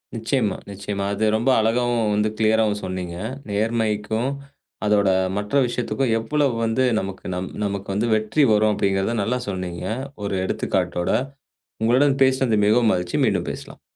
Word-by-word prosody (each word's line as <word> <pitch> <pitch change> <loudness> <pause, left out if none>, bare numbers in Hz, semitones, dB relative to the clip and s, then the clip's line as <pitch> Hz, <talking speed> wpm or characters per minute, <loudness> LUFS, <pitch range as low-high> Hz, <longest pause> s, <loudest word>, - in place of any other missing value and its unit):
நிச்சயமாக, 115 -2 -1
நிச்சயமாக 100 0 -3
அது 110 - 0
ரொம்ப 120 +4 +1
அழகாகவும் 115 -1 +1
வந்து 105 +1 +1
க்ளியராவும் 110 -1 +2
சொன்னீங்க. 90 -2 -4 0.3
நேர்மைக்கும் 110 +2 0 0.6
அதோட 100 -2 +3 0.3
மற்ற 105 +3 -4
விஷயத்துக்கும் 125 0 -1
எவ்வளவோ 140 +3 0
வந்து 115 +3 +1 0.2
நமக்கு 95 0 -6
நம் 90 +1 -4 0.2
நமக்கு 100 -1 -3
வந்து 110 +4 0
வெற்றி 110 +8 +1
வரும் 105 0 +3
அப்படி 100 - +1
என்கிறதை 95 +4 0
நல்லாக 125 +4 -1
சொன்னீங்க, 90 -2 -4 0.4
ஒரு 100 -1 -2
எடுத்துக்காட்டோட. 90 -3 -1 0.7
உங்களுடன் 135 +5 +3
பேசியது 130 -5 +2
மிகவும் 110 +1 +4
மகிழ்ச்சி, 90 -1 -1
மீண்டும் - - 0
பேசலாம். - - -10
110 Hz, 140 wpm, -22 LUFS, 100-120 Hz, 0.7 s, மிகவும்